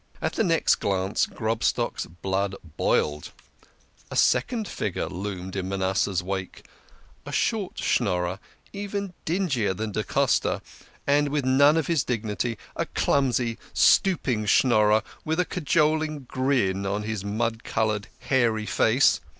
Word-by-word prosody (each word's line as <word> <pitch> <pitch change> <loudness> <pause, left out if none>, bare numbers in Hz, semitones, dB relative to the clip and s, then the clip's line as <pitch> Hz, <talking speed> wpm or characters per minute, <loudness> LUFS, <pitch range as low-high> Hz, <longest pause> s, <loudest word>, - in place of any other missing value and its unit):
At - - -2
the - - +1
next 165 -5 +3
glance 95 0 0
Grobstock's 110 +1 -1
blood 95 +4 -2 0.2
boiled. 75 0 0 0.8
A - - -6
second 220 - +2
figure 100 -5 -3
loomed 95 0 -5
in 95 -1 -3
Manasseh's 95 -1 0
wake 95 0 -5 0.6
a - - -8
short 215 -5 -1
Schnorijer, 90 -4 0 0.3
even 200 -1 -4
dingier 150 - 0
than 110 +2 -3
da - - -1
Costa, - - +1 0.4
and 145 +1 +3
with 145 -2 -1
none 140 +4 +5
of 160 - +1
his 160 -4 +1
dignity, 115 -1 -2 0.2
a - - -2
clumsy, 125 -4 +1 0.2
stooping 130 - +3
Schnorrer, 110 -2 +4 0.2
with 160 +2 -1
a 180 - +3
cajoling 155 -2 0
grin 125 -7 0
on 100 +2 -2
his 110 -2 -3
mud 115 +3 -2
coloured, 110 -2 -1
hairy 115 -5 +1
face. 115 +5 +3
115 Hz, 130 wpm, -25 LUFS, 100-145 Hz, 0.8 s, none